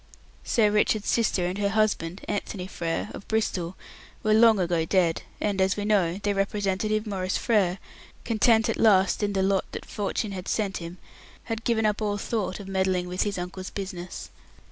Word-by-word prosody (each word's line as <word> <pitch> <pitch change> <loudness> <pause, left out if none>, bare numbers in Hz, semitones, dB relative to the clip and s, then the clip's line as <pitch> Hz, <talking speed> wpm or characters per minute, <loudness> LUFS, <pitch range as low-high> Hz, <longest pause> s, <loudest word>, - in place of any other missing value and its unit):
Sir 215 -3 +3
Richard's 210 0 +2
sister 215 -6 +2
and 180 +3 -2
her 200 -1 +1
husband, 200 -4 0
Anthony 200 -2 -3
Frere, 170 +1 -3
of - - -9
Bristol, 190 -5 -1 0.5
were 215 - +3
long 220 -1 +6
ago 170 -2 +1
dead, 170 -1 +2 0.2
and, 200 -2 0
as 190 +2 +2
we 205 - -2
know, 190 -5 +2
their 205 0 -1
representative, 200 +2 0
Maurice 190 -3 -1
Frere, 195 -6 +2 0.5
content 225 0 +3
at - - -1
last 195 -3 +4
in 205 -1 0
the 190 -1 +1
lot 195 0 +1
that - - -6
fortune 205 0 -2
had 185 -1 -6
sent 205 -3 -1
him, 170 +1 -7 0.5
had 225 -1 -4
given 225 -2 +1
up 210 0 +1
all 205 -1 0
thought 205 -2 -2
of 200 - -8
meddling 190 -2 0
with 180 +1 -2
his 205 -2 -1
uncle's 180 +1 -5
business. 185 -3 -6
200 Hz, 180 wpm, -26 LUFS, 185-215 Hz, 0.5 s, long